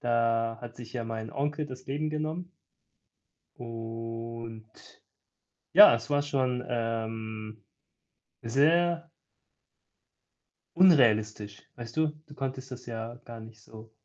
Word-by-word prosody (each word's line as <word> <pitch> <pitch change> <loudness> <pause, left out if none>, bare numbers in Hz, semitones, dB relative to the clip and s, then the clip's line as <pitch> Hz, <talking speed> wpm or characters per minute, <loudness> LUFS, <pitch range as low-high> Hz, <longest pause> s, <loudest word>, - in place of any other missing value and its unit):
da 115 -1 +1
hat 120 -1 -9
sich 120 -1 -10
ja 120 - -3
mein 110 -1 -5
Onkel 145 +2 -1
das 130 -2 -10
Leben 150 +3 -2
genommen. 155 +4 -3 1.1
Und, 115 -1 -6 1.0
ja, - - +10
es 115 +4 -6
war 145 0 +3
schon, 130 -3 0
ähm, 110 -2 -4 0.8
sehr 165 +7 +2 1.7
unrealistisch, 110 - +4
weißt 120 +1 -9
du? 160 0 +3 0.2
Du 145 - -13
konntest 135 -1 -5
das 125 0 -8
ja 115 0 -5
gar 115 -1 -9
nicht 110 -1 -13
so 110 +1 -13
115 Hz, 110 wpm, -29 LUFS, 115-140 Hz, 1.7 s, ja